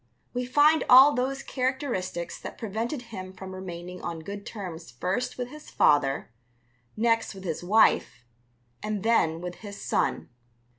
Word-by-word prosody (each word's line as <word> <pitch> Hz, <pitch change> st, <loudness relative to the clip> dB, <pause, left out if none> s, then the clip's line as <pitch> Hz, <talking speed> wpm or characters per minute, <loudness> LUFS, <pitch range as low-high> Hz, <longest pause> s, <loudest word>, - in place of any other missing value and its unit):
We 250 Hz, 0 st, -2 dB
find 295 Hz, +4 st, +5 dB
all 265 Hz, +3 st, +9 dB
those 270 Hz, +2 st, -1 dB
characteristics 255 Hz, -10 st, -2 dB
that -, -, -7 dB
prevented 230 Hz, +5 st, -3 dB
him 185 Hz, -1 st, -6 dB
from 190 Hz, 0 st, -9 dB
remaining 180 Hz, -1 st, -7 dB
on 165 Hz, -1 st, -5 dB
good 200 Hz, +4 st, -7 dB
terms 180 Hz, -, -7 dB
first 185 Hz, -, -2 dB
with 250 Hz, -1 st, -4 dB
his 300 Hz, +2 st, -11 dB
father, 140 Hz, -4 st, +2 dB, 0.7 s
next 230 Hz, -1 st, +1 dB
with 190 Hz, -, -10 dB
his 165 Hz, -2 st, -3 dB
wife, 180 Hz, -, +3 dB, 0.6 s
and 210 Hz, -2 st, -3 dB
then 165 Hz, -8 st, +2 dB
with 180 Hz, 0 st, -6 dB
his 200 Hz, -2 st, -9 dB
son. -, -, -1 dB
200 Hz, 145 wpm, -27 LUFS, 180-250 Hz, 0.7 s, all